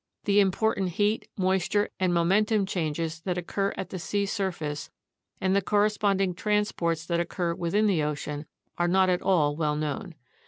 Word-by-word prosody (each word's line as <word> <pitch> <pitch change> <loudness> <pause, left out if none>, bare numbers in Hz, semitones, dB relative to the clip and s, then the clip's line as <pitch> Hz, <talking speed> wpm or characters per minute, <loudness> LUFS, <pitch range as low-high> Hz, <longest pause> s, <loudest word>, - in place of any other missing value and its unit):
The 205 0 +3
important 195 -2 +1
heat, 205 +3 0
moisture, 190 +2 +1
and 185 -1 +2
momentum 200 +5 +3
exchanges 165 -3 -2
that 180 0 -2
occur 195 +3 -1
at 190 - -4
the 185 - -4
sea 200 +4 -1
surface, 160 -8 -3 0.5
and 190 0 +1
the 200 - +3
corresponding 205 -2 +2
transports 175 -5 0
that 170 0 0
occur 170 0 -1
within 175 +6 +1
the 190 -7 +2
ocean, 150 0 -3 0.3
are 175 - +3
not 190 +1 +4
at 180 - 0
all 150 -6 +2
well 150 -1 0
known. 150 +2 -3
185 Hz, 160 wpm, -27 LUFS, 165-200 Hz, 0.5 s, not